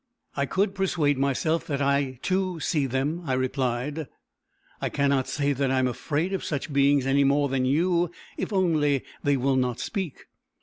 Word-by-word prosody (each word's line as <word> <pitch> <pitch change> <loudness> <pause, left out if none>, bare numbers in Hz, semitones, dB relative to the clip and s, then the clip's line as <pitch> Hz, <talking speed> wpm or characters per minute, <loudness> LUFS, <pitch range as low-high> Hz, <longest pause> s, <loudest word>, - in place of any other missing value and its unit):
"I 140 0 0
could 195 +5 +1
persuade 165 -8 +1
myself 140 +4 0
that 140 -3 -1
I, 140 -2 +1
too, 185 -2 0
see 150 -3 0
them," 135 +6 -1
I 130 - +1
replied. 130 +3 -1 0.7
"I - - 0
cannot 140 -2 +1
say 145 0 0
that 135 0 0
I 135 - +1
am 130 - +3
afraid 155 +8 -2
of 190 - -2
such 145 0 -3
beings 140 -1 +4
any 140 +1 +3
more 140 +1 +2
than 130 -1 0
you 170 +5 +2 0.3
if - - -4
only 155 -8 +2 0.2
they 145 -1 +2
will 135 +1 +1
not 125 -2 0
speak." 190 -9 -4
140 Hz, 175 wpm, -26 LUFS, 135-165 Hz, 0.7 s, beings